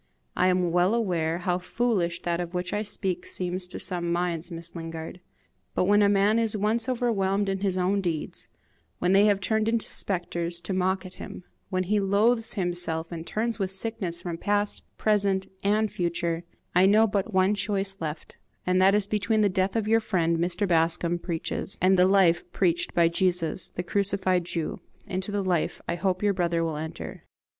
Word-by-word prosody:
I - - +3
am 180 -2 +2
well 180 +5 +3
aware 170 -7 0
how 180 0 -1
foolish 185 -4 -1
that 170 0 -1
of 175 +1 -6
which 180 0 -2
I 210 - 0
speak 190 -4 -2
seems 180 0 -3
to - - -7
some 175 -2 -2
minds, 170 -1 -1
Miss 170 0 -8
Lingard; 165 +1 -6 0.6
but - - +2
when 205 +2 +4
a 200 - +5
man 205 +2 +3
is 225 -2 0
once 220 +4 0
overwhelmed 205 -5 +1
in 195 0 -1
his 190 -2 0
own 190 +2 +1
deeds, 165 -5 -3 0.5
when 180 - +1
they 195 +2 +6
have 205 -2 +3
turned 220 +2 0
into 230 -1 +1
spectres 175 -2 -2
to 190 - -4
mock 185 0 0
at 185 - -9
him, - - -8 0.3
when 185 0 0
he 205 +3 +1
loathes 220 +4 +2
himself 175 -3 -2
and 165 -1 -6
turns 225 0 -2
with 190 -2 0
sickness 190 -3 -3
from 170 -2 -4
past, 205 0 0 0.2
present, 200 -3 +2 0.2
and 210 +2 +2
future, 170 -1 -2 0.3
I 180 +2 +5
know 215 +3 +6
but 200 0 -1
one 190 +1 +3
choice 200 -1 0
left, 155 -1 -6 0.3
and 185 +1 +2
that 195 +2 +5
is 210 -1 +2
between 215 +1 +1
the 205 - +4
death 190 +1 0
your 225 +1 +4
friend 170 -6 0
Mr. 175 +4 0
Bascombe 170 0 +2
preaches, 170 +2 -3
and 190 +1 +4
the 180 0 +5
life 185 -3 +4
preached 170 -2 0
by 170 -1 +5
Jesus, 175 0 0
the 180 - -5
crucified 190 -1 +1
Jew. 165 -2 -3 0.3
Into 190 +2 -3
the 205 -1 -1
life 180 -4 0
I - - 0
hope 185 +2 -1
your 205 -1 +3
brother 170 -2 0
will 160 -2 -2
enter." 150 - -6
185 Hz, 185 wpm, -26 LUFS, 175-205 Hz, 0.6 s, they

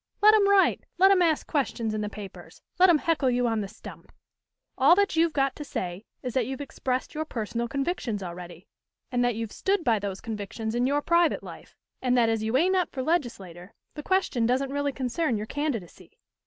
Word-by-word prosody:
"Let 425 +1 +7
'em 405 -2 +4
write; 400 -1 +4 0.2
let 385 +2 +6
'em 380 -2 +4
ask 325 -3 +2
questions 240 -7 -1
in 215 - -2
the 210 - -3
papers; 205 -2 -11 0.2
let 370 +1 +7
'em 335 - +6
heckle 305 -4 +1
you 245 0 +1
on 225 -2 0
the 200 - -4
stump. 215 +3 -12 0.6
All 280 +6 +6
that 400 -1 +1
you've 330 0 +3
got 275 -3 0
to 295 - -5
say 185 -7 -5 0.2
is 250 -2 -4
that 255 -4 0
you've 265 0 -5
expressed 260 -2 -3
your 310 - -2
personal 235 -4 -3
convictions 270 - -2
already, 175 0 -9 0.5
and 245 -1 +1
that 245 -2 +1
you've 225 -1 -4
stood 390 -2 0
by 230 -5 +2
those 195 -1 -4
convictions 220 0 -5
in 245 +1 +1
your 290 +1 0
private 340 -1 +2
life, - - -12 0.3
and 250 -1 +2
that 230 -2 +4
as 225 -1 0
you 220 +3 +1
ain't 365 +6 +3
up 365 -1 0
for 260 - -4
legislator, 220 - -3 0.2
the 300 - -7
question 295 -10 +1
don't 265 +2 0
really 285 0 0
concern 260 0 -1
your 210 - -4
candidacy. 260 - -5
255 Hz, 210 wpm, -26 LUFS, 220-315 Hz, 0.6 s, Let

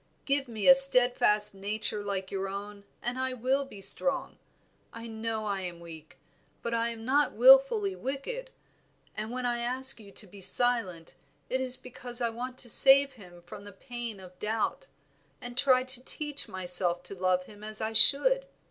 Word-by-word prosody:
Give 275 -1 -2
me 220 -4 -5
a 270 - +9
steadfast 245 -6 +6
nature 210 +1 -4
like 195 -2 -6
your 195 0 -5
own 200 +1 -10 0.2
and 245 +2 -5
I 260 0 -3
will 260 +3 -3
be 265 - -14
as 195 - +2
strong. 275 -1 0 0.5
I 230 0 -11
know 220 -1 -6
I 200 -2 -4
am 175 -2 -9
weak, 165 -2 -14 0.5
but 235 - -5
I 230 0 -2
am 225 -1 -10
not 285 +3 0
wilfully - - +3
wicked; 425 - -7 0.7
and 215 +1 -7
when 250 +1 -6
I 240 -1 -3
ask 255 +2 +3
you 200 -2 -16
to 210 - -10
be 200 +1 -16
silent, 190 -7 -1 0.4
it 260 +1 -2
is 255 -1 0
because 245 -1 -7
I 235 -1 -2
want 250 +2 -9
to 245 - -9
save 275 +4 +6
him 180 -7 -17
from 175 +3 -13
the 205 - -13
pain 235 +1 -9
of 185 -1 -16
doubt, 220 - -4 0.5
and 245 0 -9
try 255 0 +1
to 255 -1 -1
teach 295 0 -4
myself 180 -1 +3
to 180 - -12
love 185 -1 -2
him 205 +1 -17
as 215 0 -1
I 220 0 -4
should. - - +4
235 Hz, 185 wpm, -26 LUFS, 200-260 Hz, 0.7 s, a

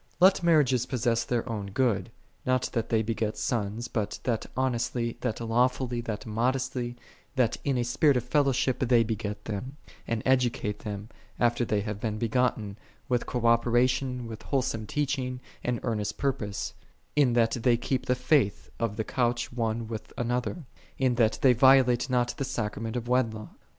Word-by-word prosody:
12. - - -29
Let - - -7
marriages 140 -7 +4
possess 120 -2 +1
their 120 0 -1
own 105 -4 -3
good, 100 -2 0 0.3
not 130 0 +1
that 115 -2 -1
they 110 -1 +2
beget 110 -1 -2
sons, 115 0 -2
but 105 -2 -2
that 115 -3 -1
honestly, 120 -2 0
that 120 -4 -2
lawfully, 120 +1 +1
that 110 -3 -5
modestly, 125 +2 -1 0.4
that 125 -4 +2
in 140 -3 +1
a 120 - +1
spirit 130 +3 +3
of 120 - -1
fellowship 135 -1 +1
they 120 -2 +4
beget 105 -2 -4
them, 125 +7 -5 0.3
and 115 -2 -1
educate 125 -5 +1
them, 105 -1 -6 0.3
after 120 0 +2
they 105 -3 0
have 105 -1 -4
been 105 -1 -2
begotten, 110 -3 0 0.3
with 125 -1 0
cooperation, 125 +1 +2
with 110 -1 -7
wholesome 125 -6 -1
teaching, 130 -3 -1 0.2
and 120 -2 -1
earnest 105 -4 -2
purpose: 105 -7 -2 0.4
in 140 -5 +4
that 115 -1 +3
they 120 -1 +4
keep 130 +2 -2
the 125 - +3
faith 125 -5 +1
of 115 -3 -1
the 110 - 0
couch 120 0 -1
one 115 -1 -1
with 110 -1 -6
another; 125 +6 -2 0.3
in 130 -2 +2
that 115 -2 +2
they 130 -2 +7
violate 130 0 +5
not 120 -1 +1
the 140 - -1
sacrament 115 -3 -3
of 120 -1 -3
wedlock. 115 -4 0
120 Hz, 165 wpm, -28 LUFS, 110-130 Hz, 0.4 s, they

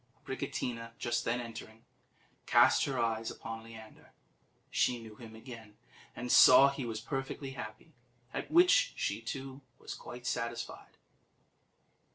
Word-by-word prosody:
Abricotina, 115 -1 -4
just 120 0 -1
then 120 +1 0
entering, 115 -1 -9 0.6
cast - - +5
her 135 -2 -2
eyes 115 -1 0
upon 115 0 -7
Leander: 110 -1 -13 0.6
she 125 - +1
knew 110 -2 -11
him 110 -1 -12
again, 110 -2 -11 0.4
and 125 0 -4
saw 135 +2 +9
he 140 -2 -5
was 110 -1 -4
perfectly 135 +3 -4
happy, 120 +5 -9 0.4
at - - -4
which 380 +9 +5
she, - - -2
too, 135 0 -6 0.2
was - - -8
quite 125 0 -10
satisfied. 115 -1 -4
120 Hz, 130 wpm, -32 LUFS, 115-135 Hz, 0.6 s, saw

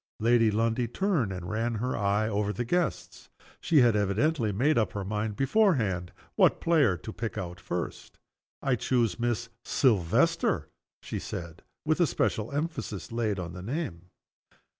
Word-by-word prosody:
Lady 115 0 +4
Lundie 115 +3 +1
turned 155 - 0
and 90 -2 -6
ran 115 +2 -1
her 125 +4 -2
eye 105 +1 +1
over 105 -1 0
her 120 - -2
guests. 175 +8 -2 0.3
She 160 -5 +4
had 120 -3 +4
evidently 110 +5 +1
made 135 +10 +2
up 110 -5 +1
her 100 -2 -4
mind, 105 +1 -2
beforehand, 125 - +2 0.2
what - - +4
player 145 - +3
to 90 +6 -8
pick 115 -5 -4
out 90 -1 -5
first. 90 -2 -5 0.5
"I 135 -2 +2
choose 120 -1 0
Miss 120 -1 -1
Silvester," 100 - +2 0.3
she - - -4
said 85 -1 -7 0.2
with 155 +2 +1
a 175 - +4
special 110 -3 -1
emphasis 140 - -4
laid 115 -3 -1
on 85 -2 -5
the 90 - -7
name. 100 - -4
110 Hz, 155 wpm, -28 LUFS, 100-130 Hz, 0.5 s, Lady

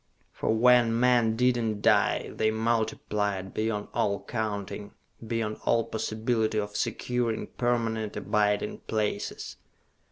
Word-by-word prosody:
] - - -39
_For - - -1
when 115 0 +4
men 120 -3 +3
did 125 +1 +3
not 110 -3 -2
die, - - +3
they 110 - +1
multiplied 110 -3 -1
beyond 110 -1 -1
all 100 -1 0
counting, 105 -2 -4 0.3
beyond 110 -2 -2
all 115 0 +3
possibility 110 0 -1
of 105 0 -4
securing 120 +1 -1
permanent 115 -3 -1
abiding 105 -1 0
places. 105 -2 -2
110 Hz, 120 wpm, -28 LUFS, 105-115 Hz, 0.3 s, when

